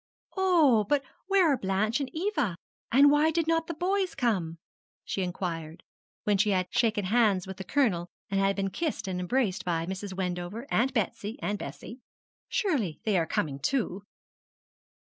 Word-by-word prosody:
'Oh! 330 - +4
but 290 -2 +2 0.2
where 375 -6 +4
are - - +1
Blanche 195 +4 0
and 275 -2 -3
Eva? 315 - -1 0.4
and 280 +4 +7
why 295 +2 +4
did 325 0 0
not 325 0 +1
the 335 - -4
boys 370 +2 0
come?' 185 -10 0 0.5
she 195 - -2
inquired, 170 -3 -4 0.4
when 205 -2 +2
she 210 +1 +3
had 185 -2 +2
shaken 220 -4 +1
hands 205 -3 +3
with 190 -1 -7
the 190 - -5
Colonel, 190 -7 +1 0.2
and 195 0 0
had 195 0 +2
been 195 -1 -1
kissed 315 - -2
and 185 -1 -2
embraced 190 -1 0
by 165 -2 -1
Mrs. 190 +2 -5
Wendover, 180 +5 -3
Aunt 255 +4 +2
Betsy, 215 +1 -2
and 205 -5 -2
Bessie: 240 - -8 0.5
'surely 260 - 0
they 215 -3 +1
are 165 -3 +2
coming 140 -3 -1
too?' 205 - -1
210 Hz, 165 wpm, -28 LUFS, 185-285 Hz, 0.5 s, and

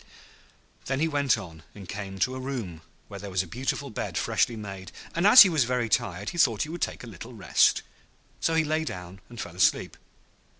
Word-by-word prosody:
Then 135 0 -1
he 160 - +2
went 140 -5 +1
on, 85 -6 -10
and 100 -3 -11
came 95 0 -6
to 130 - +2
a 130 - -5
room 120 -12 -5 0.3
where 100 - -9
there 100 +1 -7
was 95 0 0
a - - -10
beautiful 130 +6 -3
bed - - -4
freshly 120 - +1
made, 95 -4 -8 0.2
and 170 +4 +2
as 245 +5 +11
he - - +3
was 155 -7 +2
very 125 -2 -1
tired 100 -1 -1
he 175 - -6
thought 115 -9 +3
he 150 - -7
would 170 +1 -7
take - - -3
a - - -9
little 115 +4 -10
rest; 95 -8 +3 0.6
so 165 - 0
he 160 - +3
lay 155 +1 0
down 90 - -8
and 120 -1 -11
fell 85 -7 -6
asleep. 90 - +2
115 Hz, 215 wpm, -27 LUFS, 95-140 Hz, 0.6 s, as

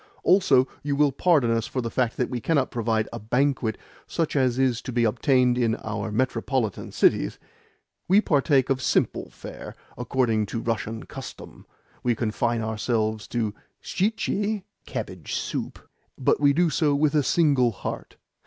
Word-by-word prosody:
"Also, 155 -9 +4
you 145 -1 -1
will 145 0 +3
pardon 140 -4 +3
us 115 -1 0
for 130 - -3
the 115 -2 -3
fact 125 -3 0
that 125 - -1
we 125 -2 -3
cannot 145 -3 +1
provide 110 -2 0
a - - -5
banquet 125 0 0 0.3
such 165 -3 -2
as 130 -3 +2
is 130 -3 +1
to 130 - -6
be 120 -1 +1
obtained 125 +2 +2
in 115 -2 +2
our 110 0 -3
metropolitan 125 -1 -1
cities? - - +2 0.7
We 195 +3 +6
partake 140 - +2
of 130 -1 0
simple - - 0
fare, - - -10 0.2
according 115 -3 0
to 115 - -3
Russian 115 -1 -3
custom - - -10 0.3
we 120 -1 +1
confine 115 +1 -1
ourselves 110 -1 -1
to 110 -4 -2 0.3
shtchi, 210 0 -1 1.5
but - - +2
we 145 -1 +5
do 170 +4 +2
so 150 -3 +2
with 145 +1 +2
a 150 - +4
single 140 -5 +3
heart. 100 - -6
125 Hz, 150 wpm, -25 LUFS, 115-145 Hz, 1.5 s, We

